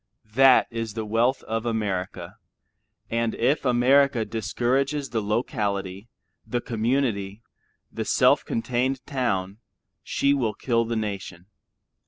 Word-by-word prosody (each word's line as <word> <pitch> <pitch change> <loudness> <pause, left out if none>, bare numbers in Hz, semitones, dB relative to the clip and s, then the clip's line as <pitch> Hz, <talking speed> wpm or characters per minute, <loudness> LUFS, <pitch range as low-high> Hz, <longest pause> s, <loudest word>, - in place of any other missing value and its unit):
That 135 +1 +6
is 115 -2 -4
the 110 -1 -3
wealth 115 +5 +1
of 115 0 -3
America, 105 -6 -3 0.7
and 115 0 0
if 135 +5 +1
America 125 0 +3
discourages 130 +7 -1
the 115 - 0
locality, 100 -2 -2 0.3
the 120 - -2
community, 115 -3 -1 0.5
the - - -3
self - - +4
contained 125 +2 -1
town, 100 -7 -2 0.4
she 140 0 +1
will 120 -6 0
kill 115 -2 0
the 115 +1 -3
nation. 100 -5 -4
115 Hz, 115 wpm, -25 LUFS, 105-130 Hz, 0.7 s, That